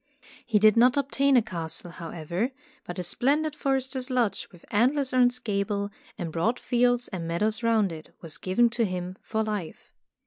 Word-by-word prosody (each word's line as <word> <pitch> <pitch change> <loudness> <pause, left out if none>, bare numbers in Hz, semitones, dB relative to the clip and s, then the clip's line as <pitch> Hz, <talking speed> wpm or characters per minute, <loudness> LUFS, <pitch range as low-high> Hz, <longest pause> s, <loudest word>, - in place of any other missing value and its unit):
He 225 -3 +3
did 215 +1 +5
not 245 +3 +5
obtain 275 -1 +3
a 235 - +4
castle, 170 -4 -4
however, 170 +5 -3 0.4
but 175 - -6
a 180 - -2
splendid 290 - +1
forester's 265 -1 -1
lodge 240 -6 0
with 175 -3 -17
antlers 260 +5 +2
on 255 - +4
its 245 0 -2
gable 200 -2 -2 0.3
and 170 -5 -4
broad 215 +10 0
fields 245 0 +2
and 175 -4 -5
meadows 210 +7 0
round 225 -5 +2
it, 160 -1 -9
was 165 -3 -2
given 230 +6 +2
to 235 -1 +1
him 185 -1 -4
for 220 0 -1
life. 210 -7 -5
215 Hz, 175 wpm, -27 LUFS, 180-250 Hz, 0.4 s, did